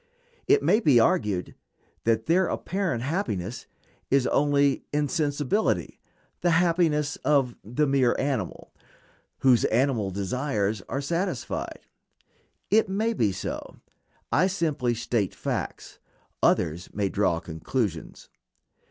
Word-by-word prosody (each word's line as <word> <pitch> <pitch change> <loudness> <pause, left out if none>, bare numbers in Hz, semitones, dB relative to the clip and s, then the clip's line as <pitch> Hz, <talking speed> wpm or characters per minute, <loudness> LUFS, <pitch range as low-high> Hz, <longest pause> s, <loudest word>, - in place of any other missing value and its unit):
It 420 +1 +4
may 215 - +4
be 145 - +5
argued 105 -5 +1 0.5
that 110 -1 +2
their 180 +3 +3
apparent 185 -11 -2
happiness 130 - -3 0.4
is 135 -1 +3
only 140 0 +2
insensibility, 145 +5 0 0.4
the 175 - +1
happiness 165 -4 +2
of 135 -4 +1
the 125 +8 0
mere 135 -3 +2
animal, 130 -10 -3 0.7
whose 130 -3 +5
animal 120 -4 +1
desires 105 +1 -1
are 135 - -2
satisfied. 170 - -3 0.9
It 215 -1 +4
may 220 +4 0
be 110 - +1
so. 95 - -6 0.6
I 185 - +4
simply 155 -10 0
state 115 -4 -1
facts, - - -4 0.4
others 85 +3 +1
may 100 -1 +1
draw 95 -4 +1
conclusions. 85 +2 -4
135 Hz, 110 wpm, -26 LUFS, 110-155 Hz, 0.9 s, be